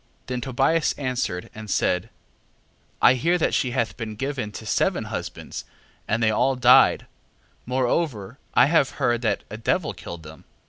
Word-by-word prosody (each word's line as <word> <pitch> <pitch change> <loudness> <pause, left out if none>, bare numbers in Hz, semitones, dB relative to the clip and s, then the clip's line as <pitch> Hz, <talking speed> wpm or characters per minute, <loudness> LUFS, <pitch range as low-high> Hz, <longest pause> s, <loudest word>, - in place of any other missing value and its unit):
6:14. - - -40
Then 125 -1 -4
Tobias 135 +6 +1
answered, 125 -10 -3
and 110 -1 -9
said: 90 +2 0 0.9
I - - +8
hear 165 +8 +1
that 165 - 0
she 130 - +1
hath 120 -2 -2
been 110 -2 -5
given 135 -3 -3
to 110 - -8
seven - - +1
husbands, - - -6 0.4
and 115 +2 0
they 110 - +4
all 130 +5 +2
died: 125 0 +5 0.6
moreover 125 - -1 0.2
I - - +7
have 145 -2 +3
heard, 120 -1 +1
that 115 - 0
a 110 - -5
devil 150 - 0
killed 85 -2 -9
them. 75 0 -13
120 Hz, 165 wpm, -24 LUFS, 110-135 Hz, 0.9 s, I